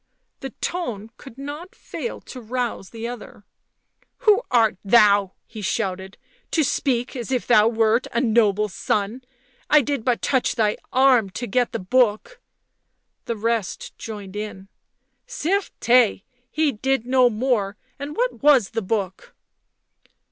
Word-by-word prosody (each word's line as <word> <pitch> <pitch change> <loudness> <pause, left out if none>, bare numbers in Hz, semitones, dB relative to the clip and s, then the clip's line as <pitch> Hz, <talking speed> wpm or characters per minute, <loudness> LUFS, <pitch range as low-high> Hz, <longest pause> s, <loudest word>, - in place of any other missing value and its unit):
The 270 - -6
tone 225 - -4
could 270 -4 -13
not 290 +6 -8
fail 475 - -6
to 255 - -10
rouse 235 -4 -3
the 230 0 -6
other. 240 -4 -9 0.4
" - - -42
Who 425 0 +6
art 225 -5 +3
thou," 205 -2 +4
he 220 -2 -10
shouted 190 -1 -3
— - - -34
" - - -44
to 320 - +3
speak 260 -2 -1
as 245 0 -5
if 250 -2 0
thou 215 -2 +5
wert 225 +1 +2
a 235 - 0
noble's 215 -4 +2
son 200 +5 -1
1 250 +3 -11 0.5
I 300 - +6
did 280 -3 -2
but 245 -1 0
touch 260 -3 +1
thy 215 -3 +1
arm 255 -5 +4
to 190 +6 -5
get 245 +3 0
the - - -2
book 240 - 0 0.4
" - - -52
The 235 - -2
rest 225 -2 -2
joined 205 -3 -8
in. 205 -2 -6 0.3
" - - -50 0.2
Certes, 290 - +1 0.3
he 310 -1 +1
did 265 +1 -1
no 255 -1 +4
more, 215 -3 -1 0.2
and 285 +2 -6
what - - -1
irns 270 -9 +5
the 225 0 -2
book?" 190 -2 -4
235 Hz, 155 wpm, -22 LUFS, 210-265 Hz, 0.5 s, Who